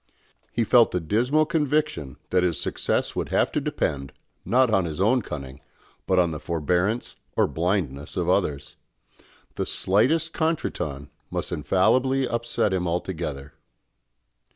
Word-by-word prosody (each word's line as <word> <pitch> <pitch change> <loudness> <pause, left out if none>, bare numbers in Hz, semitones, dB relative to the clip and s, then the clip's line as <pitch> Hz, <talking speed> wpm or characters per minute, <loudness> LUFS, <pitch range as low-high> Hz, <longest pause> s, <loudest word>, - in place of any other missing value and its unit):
He 115 - +1
felt 115 -2 +5
a - - +2
dismal 120 - +2
conviction 150 - -1
that 90 - +4
his 90 -3 0
success - - -1
would - - -2
have - - +2
to - - 0
depend, 70 -1 -2 0.3
not 125 0 +3
on 95 -3 +3
his 80 0 -5
own 115 +6 +3
cunning, 70 -6 -7 0.5
but 95 - +2
on 85 -2 +3
the 75 - -5
forbearance 90 +9 -1 0.2
or - - +5
blindness 80 -5 -2
of 90 -2 0
others. 75 -7 0 0.8
The - - 0
slightest 155 - +1
contretemps 75 - -2 0.2
must - - -4
infallibly 130 +1 +2
upset 120 -4 0
him 90 -1 0
altogether. 80 -5 -3
95 Hz, 135 wpm, -25 LUFS, 75-125 Hz, 0.8 s, felt